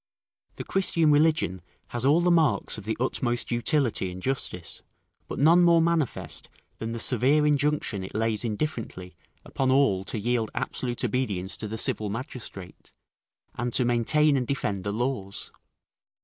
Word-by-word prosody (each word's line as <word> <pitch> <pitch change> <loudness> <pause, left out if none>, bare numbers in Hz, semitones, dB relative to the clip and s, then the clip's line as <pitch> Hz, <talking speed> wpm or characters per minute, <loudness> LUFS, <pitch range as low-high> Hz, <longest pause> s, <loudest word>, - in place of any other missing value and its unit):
The - - -6
Christian 165 -5 +2
religion 145 - +2 0.3
has 120 +1 -2
all 150 +5 +4
the 175 0 +3
marks 150 -11 +2
of 100 - -11
the 110 - -2
utmost 120 -1 -1
utility 120 -5 +1
and 90 - -8
justice: 95 - -2 0.5
but - - -6
none 165 +5 +5
more 170 -1 +5
manifest 165 -4 -1 0.3
than 115 0 -4
the 115 - -4
severe 135 +6 +4
injunction 145 -8 0
it 95 - -9
lays 110 0 0
indifferently 110 -6 -4 0.3
upon 135 -1 -1
all 130 -9 +3
to 115 - -3
yield 115 0 0
absolute 120 -1 -3
obedience 105 -6 -2
to 110 - -5
the 110 +2 -5
civil 105 -1 0
magistrate, 110 - -8 0.6
and 120 0 -3
to 125 - +2
maintain 140 +5 +3
and 125 -2 -2
defend 105 -8 -2
the 100 - -2
laws. 110 -3 -3
120 Hz, 150 wpm, -26 LUFS, 105-145 Hz, 0.6 s, none